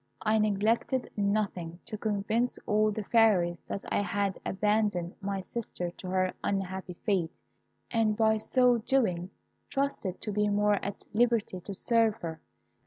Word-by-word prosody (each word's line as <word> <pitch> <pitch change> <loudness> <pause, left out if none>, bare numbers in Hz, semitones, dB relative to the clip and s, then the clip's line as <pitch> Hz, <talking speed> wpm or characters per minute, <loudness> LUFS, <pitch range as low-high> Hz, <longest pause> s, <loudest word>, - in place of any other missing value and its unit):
I 220 0 +3
neglected 215 +5 +1
nothing 200 -5 -1
to 220 - -5
convince 215 +3 0
all 215 +1 +3
the 215 0 -3
Fairies 195 -7 +3
that 200 - -5
I - - +2
had 200 -1 -1
abandoned 205 -3 0
my 195 -1 -2
sister 185 -4 -5
to 185 - -10
her 185 0 +1
unhappy 190 -2 -2
fate, 185 -6 +2 0.6
and, 220 -3 +2
by 220 -1 +4
so 245 +2 +3
doing, 210 -8 +1 0.4
trusted 275 -9 -2
to 210 - -3
be 210 +1 +1
more 205 0 +2
at 200 - -5
liberty 230 -4 +2
to 195 +3 -6
serve 230 0 +2
her. 160 -4 -6
205 Hz, 145 wpm, -29 LUFS, 190-220 Hz, 0.6 s, by